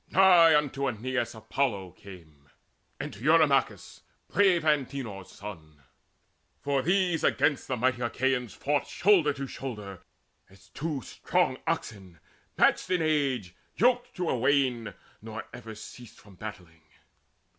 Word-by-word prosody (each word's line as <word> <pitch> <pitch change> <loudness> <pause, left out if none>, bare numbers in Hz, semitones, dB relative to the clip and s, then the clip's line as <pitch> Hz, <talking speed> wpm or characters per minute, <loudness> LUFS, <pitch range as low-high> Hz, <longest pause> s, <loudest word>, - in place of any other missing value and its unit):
Nigh 170 -5 +6
to 135 +1 -3
Aeneas 125 +1 -2
then 110 -2 -13
Apollo 110 -6 -1
came, 80 -7 -15 0.5
And - - -5
to 100 - -12
Eurymachus, 150 -3 +2 0.3
brave 190 -5 +3
Antenor's 135 -10 -1
son; 80 -8 -11 0.8
For 140 -1 0
these 175 0 +1
against 145 - +1
the 130 - -2
mighty 125 +1 0
Achaeans 125 -1 -1
fought 145 0 -1
Shoulder 180 -7 +3
to 140 -1 -5
shoulder, 105 -9 -7 0.5
as 95 -1 -20
two 140 - -4
strong - - -1
oxen, 95 -5 -4 0.4
matched - - +3
In 180 -3 +1
age, 135 - 0 0.2
yoked 245 +1 +2
to 180 -2 -2
a - - +1
wain; 125 -6 +1 0.3
nor - - -7
ever 110 0 -9
ceased 120 +2 -12
From 100 - -17
battling. 90 -5 -10
130 Hz, 130 wpm, -28 LUFS, 100-150 Hz, 0.8 s, Nigh